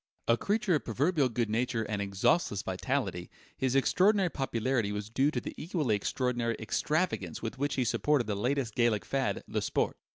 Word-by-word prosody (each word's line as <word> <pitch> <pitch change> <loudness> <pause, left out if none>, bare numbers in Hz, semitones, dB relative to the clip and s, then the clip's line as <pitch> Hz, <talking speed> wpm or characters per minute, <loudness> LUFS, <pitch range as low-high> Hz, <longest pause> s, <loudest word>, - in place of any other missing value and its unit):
A 115 - +5
creature 205 - 0
of 150 -7 +1
proverbial 140 - +1
good 120 -1 -1
nature 115 0 0
and 105 -1 -3
exhaustless 100 - +1
vitality, 95 -2 -2 0.3
his 130 0 0
extraordinary 185 +6 +3
popularity 120 -4 -1
was 105 +1 -5
due 135 +5 +3
to 155 - -1
the - - -6
equally 150 - 0
extraordinary 120 +2 -1
extravagance 155 - -1
with 115 +3 -4
which 145 +1 0
he 130 - +1
supported 130 +2 +1
that 105 - -2
latest 125 +2 -1
Gallic 120 -3 +2
fad, 135 -1 -1
"le - - -1
Sport." - - 0
125 Hz, 170 wpm, -30 LUFS, 110-145 Hz, 0.3 s, A